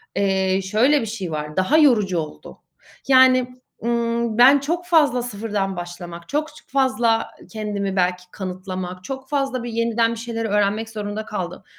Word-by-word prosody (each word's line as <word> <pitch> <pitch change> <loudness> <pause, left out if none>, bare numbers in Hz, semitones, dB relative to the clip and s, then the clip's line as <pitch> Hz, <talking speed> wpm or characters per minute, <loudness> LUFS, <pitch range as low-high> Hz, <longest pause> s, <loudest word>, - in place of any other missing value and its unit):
eee, 190 -1 +1
şöyle 240 +10 +3
bir - - -3
şey 205 -6 -5
var. 150 0 -5
Daha 185 +12 +3
yorucu 220 - +4
oldu. 155 -1 -8 0.5
Yani, 260 -1 +6 0.4
ımm, 235 -1 0
ben 265 +4 +7
çok 340 +6 -2
fazla 300 -8 +3
sıfırdan 205 -4 -3
başlamak, 175 -1 -8
çok 300 +2 0
ç - - -15
fazla 255 -4 +1 0.2
kendimi 205 -3 -3
belki 180 -1 +1
kanıtlamak, 185 -1 -6
çok 265 +5 -7
fazla 270 -4 -1
bir 240 - -4
yeniden 230 0 +1
bir 230 - -5
şeyleri 230 -1 -3
öğrenmek 210 +2 0
zorunda 210 0 -5
kaldım. 185 -4 -5
225 Hz, 155 wpm, -22 LUFS, 190-250 Hz, 0.5 s, ben